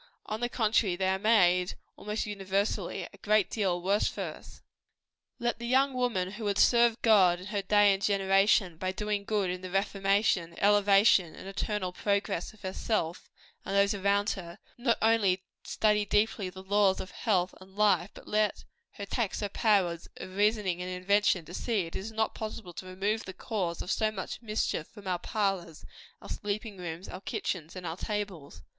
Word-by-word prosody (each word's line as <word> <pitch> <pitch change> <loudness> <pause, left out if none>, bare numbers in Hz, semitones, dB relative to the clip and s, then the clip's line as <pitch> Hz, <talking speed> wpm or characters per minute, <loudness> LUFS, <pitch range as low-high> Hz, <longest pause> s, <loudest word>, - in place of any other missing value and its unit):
On 215 - -4
the 240 +1 -1
contrary, 220 -5 +2
they 190 +1 0
are 190 0 0
made, 180 -4 +3 0.2
almost 210 +1 -3
universally, 200 0 -2
a - - -14
great 215 -2 +2
deal 190 -5 0
worse 200 +3 +2
for - - -4
us. - - -9 0.7
Let 240 -1 -1
the 235 - -5
young 265 +2 +3
woman 230 -8 0
who 215 +2 -8
would 200 -1 0
serve 235 0 +4
God 190 -6 +5
in 180 - -9
her 205 0 -2
day 205 0 +5
and 195 - -3
generation, 195 -2 +3
by 185 +2 -2
doing 210 0 -2
good 200 -4 0
in 180 0 -5
the 185 - -6
reformation, 195 -2 +1
elevation, 200 -3 +4
and - - -10
eternal 195 -1 -3
progress 200 -2 -1
of 215 - -21
herself 185 -2 -2 0.3
and 195 - -3
those 200 +1 +4
around 200 +1 +1
her, 170 -3 -7 0.2
not 240 -1 +1
only 200 -5 +3 0.2
study 210 -1 +1
deeply 205 -1 +1
the 190 +1 -11
laws 200 -1 +3
of 185 - -7
health 185 -6 0
and 190 +1 -15
life, 200 -3 +3
but - - -13
let 210 -1 0 0.3
her 200 - -6
tax 215 0 -2
her 205 - -2
powers 190 -6 +1
of 185 - -8
reasoning 205 -3 +1
and 180 - -4
invention, 185 -1 +2
to 175 - -11
see 225 +1 0
if 170 - -4
it - - -12
is 210 +4 -6
not 220 0 0
possible 215 -4 -6
to 185 - -8
remove 200 +4 -2
the 190 - -7
cause 185 -4 -3
of 180 - -4
so 220 -1 +2
much 205 +1 -6
mischief 215 -8 -2
from 205 -2 -14
our 180 -1 0
parlors, 190 -5 -2 0.4
our - - -10
sleeping 205 -1 -4
rooms, 175 +1 -6
our 185 - -8
kitchens, 185 -7 -4
and 185 -1 -7
our 165 +1 -4
tables. 185 - -5
200 Hz, 185 wpm, -29 LUFS, 185-215 Hz, 0.7 s, God